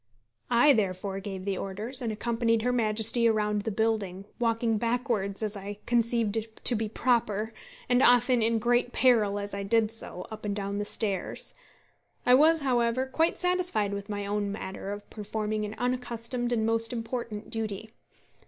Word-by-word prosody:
I 245 +4 +6
therefore 195 -2 -1
gave 195 -1 -6
the 195 -2 -1
orders, 215 +7 -5
and 230 -2 -1
accompanied 230 0 0
her 250 +1 +1
Majesty 225 0 +3
around 210 -2 +1
the 220 - -3
building, 200 -3 -1
walking 230 -2 +1
backwards, 230 -4 -1
as 210 -1 -2
I 200 +1 -6
conceived 230 -2 0
to 245 - +4
be 220 -1 -2
proper, 220 -2 0 0.3
and 250 -1 +3
often 245 -1 +5
in 225 +1 +2
great 240 +2 +1
peril 220 -6 +3
as 205 0 -5
I 200 - -3
did 215 +2 +2
so, 205 -5 -5
up 220 0 -8
and 205 -1 -2
down 200 0 -3
the 205 - -2
stairs. 200 -3 0 0.7
I 250 - +6
was, 315 +4 +5
however, 245 -1 +1
quite 320 +6 0
satisfied 360 - 0
with 200 +1 -6
my 205 -1 -3
own 205 0 -1
manner 195 -1 -6
of 205 0 -6
performing 215 0 -3
an 210 +1 -6
unaccustomed 245 -1 -2
and 225 -2 +1
most 225 0 +2
important 230 -2 -5
duty. 220 -1 -4
225 Hz, 165 wpm, -28 LUFS, 205-240 Hz, 0.7 s, I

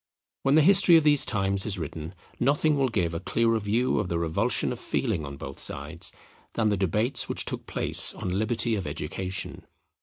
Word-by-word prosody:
When 135 +2 +2
the 155 - +6
history 185 -1 +6
of 160 - +3
these 145 -2 +5
times 95 -3 +1
is 105 -2 -2
written, 80 +1 -6 0.2
nothing 145 +4 +2
will 135 -2 +2
give 90 -8 -1
a 85 - -3
clearer 115 +3 +1
view 110 +5 0
of 100 -4 -2
the 85 - -1
revulsion 80 -1 0
of - - -5
feeling 80 -3 -2
on 70 0 -8
both 70 -2 -8
sides, - - -4 0.4
than 110 -2 +2
the 105 - +1
debates 105 +6 0
which - - +1
took - - -5
place - - +1
on - - -4
Liberty 115 +4 0
of 100 -7 -2
Education. 90 +6 -5
105 Hz, 190 wpm, -26 LUFS, 85-125 Hz, 0.4 s, the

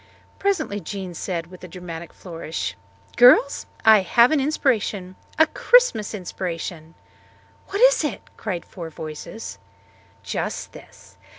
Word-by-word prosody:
Presently 390 - 0
Jean 190 0 -6
said 170 -1 -3
with 180 +2 -14
a - - -7
dramatic 170 -2 -8
flourish, 165 - -5 0.4
"Girls, 250 +3 +6 0.2
I 220 -1 +8
have 235 - +4
an 310 - +3
inspiration 220 -10 0 0.2
a 315 - +7
Christmas 315 - +3
inspiration!" 175 -3 -5 0.7
"What 400 +3 -3
is - - +6
it?" - - -3
cried 185 -6 -4
four 170 -4 -8
voices. 155 - -8 0.6
"Just - - -4
this. - - -16
190 Hz, 120 wpm, -23 LUFS, 170-245 Hz, 0.7 s, I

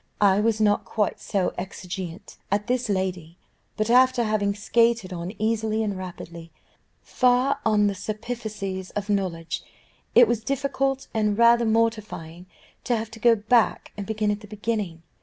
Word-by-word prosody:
I 200 -1 +4
was 220 0 +1
not 205 -1 +3
quite 210 -3 -1
so 195 -4 -1
exigeante 185 0 -7
as 200 +1 +1
this 245 -1 -1
lady; 185 -4 -2 0.4
but, 215 - 0
after 255 0 +5
having 210 -2 0
skated 225 -2 +1
on 175 +1 -5
easily 220 0 0
and 205 -2 -2
rapidly, 170 -2 -8 0.5
far 255 +2 +2
on 210 -2 +3
the 200 - +1
superficies 210 -2 -5
of 205 0 -2
knowledge, 170 -4 -2 0.5
it 245 -1 +8
was 225 -1 -1
difficult 275 +1 -1
and 210 -2 +1
rather 235 0 +5
mortifying 215 -7 -1 0.4
to 240 - +1
have 220 0 -5
to 225 - -11
go 235 +1 +5
back 225 +2 +1
and 200 -2 -6
begin 215 -1 0
at 205 - -2
the 210 - -13
beginning. 205 -5 -3
210 Hz, 155 wpm, -25 LUFS, 190-230 Hz, 0.5 s, it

